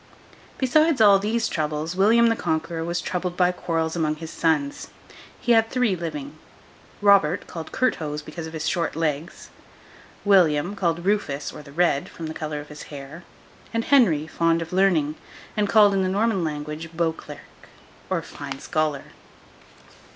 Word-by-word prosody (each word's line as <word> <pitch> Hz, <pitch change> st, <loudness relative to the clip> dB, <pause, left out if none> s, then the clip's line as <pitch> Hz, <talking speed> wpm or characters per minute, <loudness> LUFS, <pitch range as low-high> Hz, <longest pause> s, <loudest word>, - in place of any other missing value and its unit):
Besides 305 Hz, +3 st, +3 dB
all 200 Hz, -3 st, +7 dB
these 225 Hz, +3 st, 0 dB
troubles, 155 Hz, +1 st, -2 dB
William 220 Hz, +5 st, +5 dB
the 230 Hz, -, +2 dB
Conqueror 165 Hz, -2 st, -2 dB
was 170 Hz, +1 st, -2 dB
troubled 180 Hz, -1 st, -3 dB
by 180 Hz, -1 st, +4 dB
quarrels 165 Hz, -2 st, -2 dB
among 155 Hz, -2 st, 0 dB
his 160 Hz, +1 st, -8 dB
sons. 150 Hz, -4 st, 0 dB, 0.5 s
He 245 Hz, -, 0 dB
had 225 Hz, -1 st, +4 dB
three 250 Hz, -6 st, +1 dB
living. 230 Hz, -, -6 dB, 0.6 s
Robert, 200 Hz, -4 st, +4 dB
called 165 Hz, -2 st, -8 dB
Curthose, 150 Hz, -12 st, -1 dB
because 160 Hz, +1 st, -7 dB
of 160 Hz, -, -10 dB
his 160 Hz, 0 st, -3 dB
short 170 Hz, -1 st, -1 dB
legs; 160 Hz, 0 st, -3 dB, 0.7 s
William, 180 Hz, -2 st, +3 dB
called 170 Hz, -3 st, -1 dB
Rufus 155 Hz, -9 st, -1 dB
or 150 Hz, -, -9 dB
the 140 Hz, -, -14 dB
Red, 155 Hz, -3 st, +1 dB
from 165 Hz, -, -8 dB
the 155 Hz, -, -5 dB
colour 155 Hz, -2 st, -4 dB
of 145 Hz, -, -10 dB
his 150 Hz, -1 st, -10 dB
hair; 145 Hz, +4 st, -9 dB, 0.5 s
and 230 Hz, -, 0 dB
Henry, 190 Hz, -, +4 dB
fond 165 Hz, +1 st, +1 dB
of 165 Hz, -, -11 dB
learning, 170 Hz, -6 st, +2 dB, 0.4 s
and 210 Hz, -1 st, 0 dB
called, 210 Hz, -2 st, +6 dB
in 195 Hz, -, +1 dB
the 185 Hz, -, 0 dB
Norman 200 Hz, -1 st, +1 dB
language, 150 Hz, +1 st, -4 dB
Beauclerc, 165 Hz, -1 st, -5 dB, 0.4 s
or -, -, -1 dB
Fine 140 Hz, -1 st, -7 dB
Scholar. 155 Hz, -1 st, -1 dB
165 Hz, 160 wpm, -24 LUFS, 155-200 Hz, 0.7 s, all